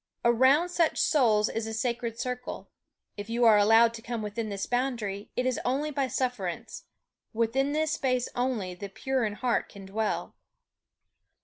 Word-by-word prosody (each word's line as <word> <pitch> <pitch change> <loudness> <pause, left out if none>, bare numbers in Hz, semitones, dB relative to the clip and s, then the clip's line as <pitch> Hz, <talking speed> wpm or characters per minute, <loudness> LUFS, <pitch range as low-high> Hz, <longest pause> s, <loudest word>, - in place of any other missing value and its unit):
Around 260 +8 +4
such 340 -2 +1
souls 225 -8 +3
is 225 0 -3
a 220 - -4
sacred 235 0 -2
circle 250 0 -5 0.5
if 205 +1 -7
you 235 +1 +2
are 215 -2 +7
allowed 225 +2 +5
to 230 - -8
come 230 -1 -4
within 215 +1 -4
this 200 -1 -3
boundary, 235 -6 -2
it 250 - 0
is 255 -1 0
only 280 +4 0
by 275 -2 0
sufferance; 245 -10 -3 0.5
within 235 +5 +1
this 310 +1 0
space 255 -4 0
only 245 -7 -1
the 195 +3 -7
pure 260 +5 -1
in 210 - -2
heart 240 +3 -1
can 200 -1 -11
dwell. 215 +3 -2
235 Hz, 165 wpm, -28 LUFS, 215-255 Hz, 0.5 s, are